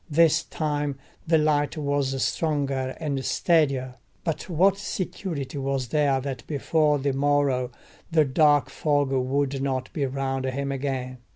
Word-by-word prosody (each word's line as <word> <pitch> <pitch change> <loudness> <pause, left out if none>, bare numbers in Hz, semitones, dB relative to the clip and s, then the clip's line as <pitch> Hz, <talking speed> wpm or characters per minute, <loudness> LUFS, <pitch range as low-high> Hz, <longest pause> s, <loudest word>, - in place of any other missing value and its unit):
This 165 +1 +4
time 145 -3 -2 0.3
the 160 0 +5
light 150 -1 +1
was 140 -2 0
stronger 140 -4 -1
and 140 -4 -2
steadier; 135 -8 +1 0.3
but 165 +1 -3
what 190 +4 +3
security 165 -8 -4
was 135 -2 -2
there 145 -2 +2
that 130 -3 -4
before 150 0 +2
the 140 0 -1
morrow 140 -2 +1 0.4
the 160 -3 +4
dark 145 -1 +3
fog 145 -2 +1
would 135 +1 0
not 130 -2 -2
be 140 -3 0
round 135 0 -2
him 140 +1 -2
again? 130 -2 -3
140 Hz, 135 wpm, -25 LUFS, 135-150 Hz, 0.4 s, the